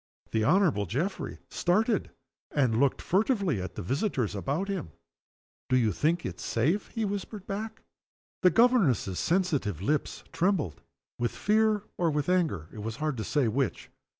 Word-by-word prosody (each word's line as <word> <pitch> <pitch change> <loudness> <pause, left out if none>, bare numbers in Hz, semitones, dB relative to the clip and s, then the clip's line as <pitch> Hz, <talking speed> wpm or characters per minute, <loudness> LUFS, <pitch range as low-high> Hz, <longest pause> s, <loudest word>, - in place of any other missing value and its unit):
The 110 -1 +1
Honorable 150 - +3
Geoffrey 155 - -2
started, 210 +5 +1 0.4
and 125 -6 +1
looked 140 -1 +2
furtively 195 - +1
at 95 - -6
the 105 - -5
visitors 130 - -1
about 140 - -2
him. 195 - -3 0.8
"Do 130 - +3
you 115 -4 +3
think 160 - 0
it's 90 -1 -5
safe?" 160 - +1
he 225 -1 -2
whispered 205 0 -4
back. 220 +2 -5 0.6
The 180 - +7
governess's 180 - +3
sensitive 160 - 0
lips 145 +9 -1
trembled, 165 - 0 0.4
with 120 -1 0
fear 215 0 +2 0.2
or 170 -2 +3
with 150 +1 -1
anger, 160 - +1
it 110 - -8
was 110 +1 -4
hard 155 +1 -1
to 110 - -2
say 140 0 +1
which. 125 +1 -1
155 Hz, 150 wpm, -29 LUFS, -, 0.8 s, The